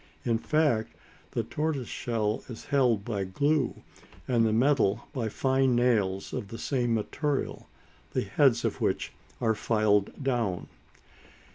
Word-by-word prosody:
In 115 -2 +2
fact, 145 -7 +1 0.3
the - - -1
tortoise 150 -5 -2
shell 110 -3 -2
is 115 - -8
held 125 -7 +2
by 105 -5 -2
glue, 140 +8 0 0.4
and 120 -3 +3
the 110 - +3
metal 120 -3 +3
by 120 -6 -2
fine 130 +2 +2
nails 105 -6 +1
of 100 - -3
the 115 - -7
same 120 -4 0
material, 140 +6 -2 0.4
the - - +1
heads - - +3
of - - -2
which - - 0 0.3
are 110 - +2
filed 105 +2 +1
down. 115 -9 -1
115 Hz, 135 wpm, -28 LUFS, 110-135 Hz, 0.4 s, and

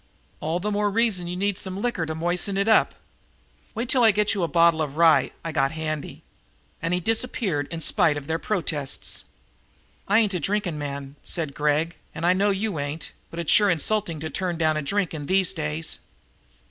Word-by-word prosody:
"All 160 +3 -1
the 210 +3 -2
more 205 0 +1
reason 205 -5 +1
you 175 - -4
need 200 0 0
some 190 0 -4
liquor 205 -8 -1
to 160 - -3
moisten 175 +4 -1
it 200 +2 +1
up. 220 - +4 0.8
Wait 235 +3 -2
till 250 -1 +3
I 225 - +8
get 210 0 +2
you 200 - -2
a 170 - +1
bottle 165 0 +4
of 150 -1 -3
rye 165 -1 +5 0.2
I 165 - -2
got 140 -1 +1
handy." 155 -2 -4 0.6
And 165 +1 -1
he 180 - +2
disappeared 210 - +1
in 165 -1 -5
spite 150 -1 +3
of 145 - -6
their 160 +2 -1
protests. 155 -9 -2 0.8
"I 205 - +4
ain't 215 -3 +3
a 180 - -1
drinking 185 -2 -1
man," 140 -1 -6
said 155 -5 -2
Gregg, 150 +3 0 0.2
"and 165 - -3
I 180 - +5
know 200 +2 +2
you 200 -4 -1
ain't, 145 +3 -4 0.2
but 165 - -10
it's 170 - 0
sure 205 -1 +6
insulting 170 -1 0
to 160 -1 -4
turn 180 0 -2
down 155 -1 +2
a 155 - -1
drink 195 +5 -1
in 145 -3 -5
these 190 0 +2
days!" 155 -1 -3
170 Hz, 200 wpm, -24 LUFS, 155-200 Hz, 0.8 s, I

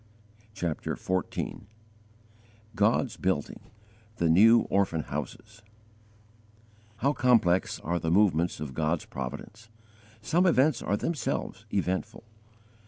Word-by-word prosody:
CHAPTER 85 -5 -3
XIV 95 -1 -3 1.1
GOD'S 110 +3 +1
BUILDING: 95 -6 -2 0.6
THE 85 - +1
NEW 110 +7 +7
ORPHAN 95 -5 +1
HOUSES 110 +1 -7 1.3
How 140 +8 +1
complex 115 -9 +2
are 85 +2 -1
the 80 - -2
movements 90 -3 +2
of 75 -3 -6
God's 80 +3 -1
providence! 75 - -8 0.5
Some 170 - +2
events 150 -4 +3
are 100 - 0
themselves 110 - -3
eventful. 95 +2 -2
100 Hz, 100 wpm, -28 LUFS, 85-115 Hz, 1.3 s, NEW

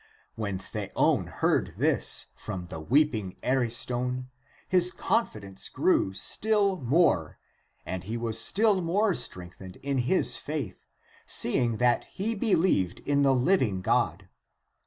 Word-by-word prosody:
When 100 -4 -4
Theon 95 - -1
heard - - -1
this - - +2
from 95 -4 -7
the 80 - -6
weeping 110 - 0
Ariston, 125 0 -1 0.4
his 180 -1 +4
confidence 105 - -3
grew 95 - +1
still 200 - +2
more, 125 - +1 0.5
and 95 -1 -5
he 110 +4 -4
was 115 -1 +1
still 200 - +3
more 195 +4 +1
strengthened 90 - -4
in 140 -1 -1
his 130 +10 +1
faith, 140 -11 -6 0.4
seeing 120 -2 +3
that 120 +1 +1
he 210 +4 -3
believed 185 - +1
in 145 0 0
the 135 -1 +3
living 125 - +1
God. - - 0
125 Hz, 120 wpm, -27 LUFS, -, 0.5 s, his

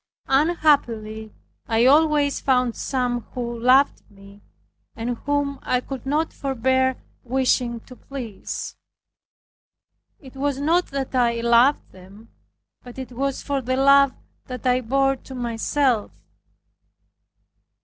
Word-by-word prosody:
Unhappily 265 -8 +1 0.4
I 225 +1 +2
always 295 0 +3
found 250 -3 +1
some 250 -2 -2
who 235 -1 -4
loved 260 +4 +4
me, 200 0 -17 0.5
and 240 +2 -3
whom 285 -1 0
I 250 - 0
could 265 +1 -8
not 310 +3 0
forbear 260 0 0 0.3
wishing 250 -2 0
to 255 - -14
please. 245 -7 -7 1.4
It 270 -2 -15
was 280 0 -1
not 335 +5 +2
that 275 -1 -4
I 235 -2 +1
loved 235 +4 +3
them, 195 +4 -16 0.5
but 245 0 -12
it 260 -1 -7
was 270 +2 -3
for 280 -1 -2
the 255 +1 -2
love 275 0 +5 0.3
that 255 0 -7
I 250 0 +2
bore 270 +3 +1
to 265 - -11
myself. 240 0 0
255 Hz, 120 wpm, -23 LUFS, 235-275 Hz, 1.4 s, love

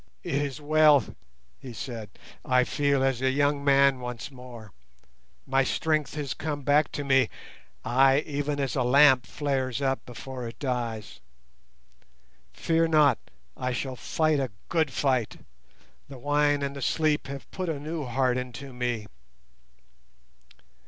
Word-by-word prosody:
"It - - -4
is 140 0 -1
well," 150 -2 +5 0.6
he 130 -3 -9
said. 110 0 -6 0.3
"I 125 0 +3
feel 140 0 +1
as 135 -2 0
a 130 - +2
young 145 +1 +1
man 140 -1 +4
once 125 +2 -6
more. 125 -5 -11 0.7
My 135 0 +2
strength 155 +2 -1
has 145 -5 -3
come 145 -2 -4
back 145 +2 +3
to 145 - -3
me, 135 -4 +3 0.6
ay, 135 +3 +4
even 145 0 -2
as 135 -3 -1
a 135 - +1
lamp 130 0 +5
flares 135 -4 -2
up 135 -1 -1
before 125 +1 -7
it 115 - -9
dies. 120 -6 -4 1.3
Fear 165 0 +1
not, 150 -6 +4 0.4
I 130 -1 -2
shall 130 +1 -3
fight 155 +3 0
a 135 -2 -1 0.2
good 160 -4 +1
fight; 130 -3 0 0.7
the 135 - -9
wine 145 +2 +1
and 140 0 -3
the 140 - -7
sleep 155 0 +1
have 140 0 -8
put 185 -2 -4
a 155 -3 -2
new 155 0 -4
heart 125 0 +1
into 125 +2 -8
me. 120 -3 -2
135 Hz, 145 wpm, -27 LUFS, 125-145 Hz, 1.3 s, well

